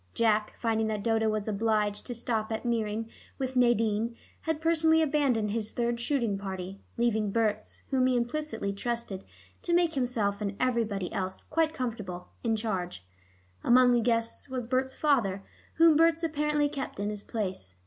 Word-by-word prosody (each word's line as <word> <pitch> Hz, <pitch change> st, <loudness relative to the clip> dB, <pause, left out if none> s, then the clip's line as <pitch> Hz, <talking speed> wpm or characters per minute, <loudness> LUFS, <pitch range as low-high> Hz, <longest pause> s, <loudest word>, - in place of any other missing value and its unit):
Jack, 215 Hz, -2 st, +2 dB
finding 225 Hz, -1 st, 0 dB
that 210 Hz, -2 st, -2 dB
Dodo 225 Hz, -1 st, +2 dB
was 215 Hz, -1 st, -1 dB
obliged 210 Hz, -1 st, 0 dB
to 245 Hz, -, -4 dB
stop 225 Hz, -2 st, -2 dB
at 220 Hz, +2 st, -3 dB
Meering 225 Hz, -2 st, -1 dB, 0.3 s
with 260 Hz, -1 st, -3 dB
Nadine, 230 Hz, -2 st, +2 dB, 0.3 s
had 320 Hz, -2 st, -1 dB
personally 320 Hz, 0 st, +4 dB
abandoned 275 Hz, -9 st, +2 dB
his 220 Hz, 0 st, -1 dB
third 235 Hz, 0 st, 0 dB
shooting 235 Hz, -6 st, 0 dB
party, 190 Hz, 0 st, -6 dB, 0.2 s
leaving 220 Hz, -3 st, +1 dB
Berts, 215 Hz, -1 st, -1 dB
whom 260 Hz, -1 st, +3 dB
he 255 Hz, -, +2 dB
implicitly 240 Hz, -4 st, -2 dB
trusted 230 Hz, -2 st, -3 dB, 0.4 s
to 345 Hz, -, +1 dB
make 345 Hz, -2 st, +3 dB
himself 230 Hz, -6 st, 0 dB
and 200 Hz, -1 st, -3 dB
everybody 225 Hz, -7 st, 0 dB
else 190 Hz, -1 st, -3 dB
quite 320 Hz, 0 st, +1 dB
comfortable, 215 Hz, -, -5 dB
in 225 Hz, -2 st, +2 dB
charge. 185 Hz, -, -3 dB, 0.6 s
Among 250 Hz, +1 st, +6 dB
the 240 Hz, -, +3 dB
guests 230 Hz, +3 st, 0 dB
was 255 Hz, -2 st, -3 dB
Berts' 260 Hz, +2 st, 0 dB
father, 225 Hz, -11 st, +1 dB, 0.3 s
whom 330 Hz, -1 st, +6 dB
Berts 330 Hz, +1 st, +4 dB
apparently 300 Hz, -2 st, +1 dB
kept 275 Hz, -7 st, -5 dB
in 205 Hz, +1 st, -1 dB
his 210 Hz, -1 st, -5 dB
place. 190 Hz, -, -4 dB
230 Hz, 160 wpm, -29 LUFS, 210-260 Hz, 0.6 s, Among